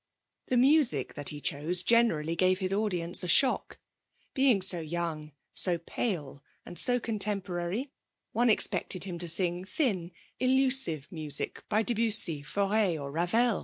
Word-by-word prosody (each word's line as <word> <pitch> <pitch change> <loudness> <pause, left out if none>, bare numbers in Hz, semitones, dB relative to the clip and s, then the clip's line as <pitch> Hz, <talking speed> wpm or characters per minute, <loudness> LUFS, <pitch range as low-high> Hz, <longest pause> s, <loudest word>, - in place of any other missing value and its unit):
The 255 - 0
music 255 - +3
that 145 - -2
he 150 - -6
chose 160 +6 0
generally 170 -10 +2
gave 185 +2 +2
his 190 0 -3
audience 185 -4 -2
a - - -4
shock. 260 +9 +2 0.6
Being 260 -8 +3
so 185 -2 +2
young, 160 -1 -5 0.2
so 180 -2 +1
pale, 160 - -4 0.2
and 175 - -10
so 245 0 +3
contemporary, 205 +1 -2 0.4
one 240 +1 +1
expected 190 -3 +3
him 180 -3 -6
to 175 - -4
sing 175 +1 0
thin, 190 - -2 0.3
elusive 255 - +1
music 155 -4 -4
by 215 +1 +1
Debussy, 220 - +2
Fauré, 200 +1 0
or 140 -1 -6
Ravel. 200 +8 +1
185 Hz, 140 wpm, -29 LUFS, 165-230 Hz, 0.6 s, music